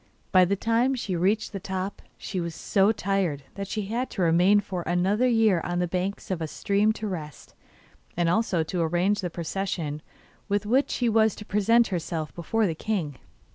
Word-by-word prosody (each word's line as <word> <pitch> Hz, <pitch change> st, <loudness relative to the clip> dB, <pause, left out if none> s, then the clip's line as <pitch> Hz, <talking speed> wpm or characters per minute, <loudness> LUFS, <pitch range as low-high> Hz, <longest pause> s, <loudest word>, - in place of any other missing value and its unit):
By 185 Hz, -1 st, +6 dB
the 200 Hz, +3 st, +1 dB
time 230 Hz, +6 st, +1 dB
she 205 Hz, -7 st, -3 dB
reached 195 Hz, +6 st, +1 dB
the 195 Hz, -, -3 dB
top, 190 Hz, +1 st, -4 dB, 0.2 s
she 190 Hz, -, -4 dB
was 170 Hz, -2 st, -4 dB
so 195 Hz, +5 st, +2 dB
tired 190 Hz, -9 st, -1 dB
that 200 Hz, 0 st, -5 dB
she 210 Hz, +1 st, -3 dB
had 235 Hz, +5 st, -2 dB
to 190 Hz, -, -2 dB
remain 175 Hz, +5 st, +5 dB
for 185 Hz, -3 st, -4 dB
another 190 Hz, +8 st, +1 dB
year 220 Hz, -7 st, +3 dB
on 175 Hz, 0 st, -2 dB
the 180 Hz, 0 st, +1 dB
banks 185 Hz, +3 st, -3 dB
of 175 Hz, -3 st, -2 dB
a 160 Hz, -, -2 dB
stream 200 Hz, +6 st, +1 dB
to 215 Hz, -, -6 dB
rest, 155 Hz, -7 st, -7 dB, 0.6 s
and 175 Hz, -1 st, +2 dB
also 180 Hz, -2 st, +1 dB
to 175 Hz, +2 st, -2 dB
arrange 175 Hz, +5 st, +1 dB
the 180 Hz, -, -2 dB
procession 165 Hz, -3 st, -3 dB, 0.5 s
with 205 Hz, +1 st, 0 dB
which 260 Hz, +6 st, +2 dB
she 245 Hz, -, 0 dB
was 220 Hz, -1 st, +3 dB
to 210 Hz, -, -10 dB
present 230 Hz, +4 st, +3 dB
herself 165 Hz, -4 st, -3 dB
before 215 Hz, +6 st, 0 dB
the 170 Hz, -, 0 dB
king. 160 Hz, -6 st, -3 dB
195 Hz, 190 wpm, -26 LUFS, 175-215 Hz, 0.6 s, By